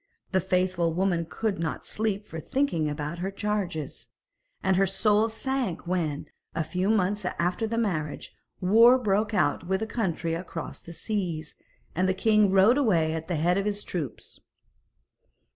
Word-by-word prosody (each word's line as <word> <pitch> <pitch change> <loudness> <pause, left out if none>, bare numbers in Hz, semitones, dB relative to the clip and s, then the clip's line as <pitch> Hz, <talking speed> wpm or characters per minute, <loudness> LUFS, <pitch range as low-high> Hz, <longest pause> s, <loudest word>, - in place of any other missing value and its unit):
The 190 - +3
faithful 180 -2 +1
woman 175 -2 0
could 220 -6 -2
not 160 -1 -3
sleep 210 -1 -2
for 165 - -7
thinking 170 - 0
about 150 +3 -4
her 190 +2 -2
charges, 195 -6 -3 0.6
and 190 - +3
her 195 +1 +3
soul 210 +3 +2
sank 230 -5 -2
when, 170 -5 -1 0.3
a 165 - 0
few 180 +5 -1
months 205 -1 +1
after 180 +4 -1
the 230 +1 -2
marriage, 160 -10 -2 0.3
war 230 +7 +6
broke 210 -2 0
out 165 -1 +1
with 190 +3 0
a - - 0
country 180 -7 -2
across 165 -1 -6
the 170 - -11
seas, 170 -3 -3 0.4
and 185 +3 +1
the 185 - +1
king 215 0 +4
rode 195 +8 +5
away 170 - +2
at 160 0 -4
the 175 - -1
head 175 +5 +2
of 195 - -2
his 205 0 -2
troops. 150 -10 -6
185 Hz, 160 wpm, -27 LUFS, 165-210 Hz, 0.6 s, war